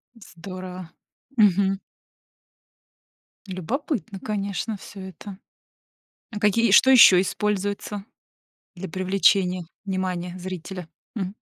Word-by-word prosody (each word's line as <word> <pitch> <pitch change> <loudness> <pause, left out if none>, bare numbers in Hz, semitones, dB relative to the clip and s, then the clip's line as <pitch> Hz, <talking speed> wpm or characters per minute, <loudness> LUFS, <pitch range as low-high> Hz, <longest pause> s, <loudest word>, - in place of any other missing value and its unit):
Здорово! 185 -3 -9 0.5
Мгм. 195 -1 +3 1.7
Любопытно, 195 - -4
конечно, 205 +1 -3
всё 195 0 -11
это. 190 +1 -9 1.0
А 210 - -5
какие 215 +2 +3
что 260 +6 +7
ещё 205 -8 +9
используется 205 +1 -2 0.7
для 190 +2 -6
привлечения 185 0 +2 0.2
внимания 185 -2 -3
зрителя, 180 -1 -7 0.3
м? 195 -1 -3
190 Hz, 85 wpm, -24 LUFS, 185-205 Hz, 1.7 s, ещё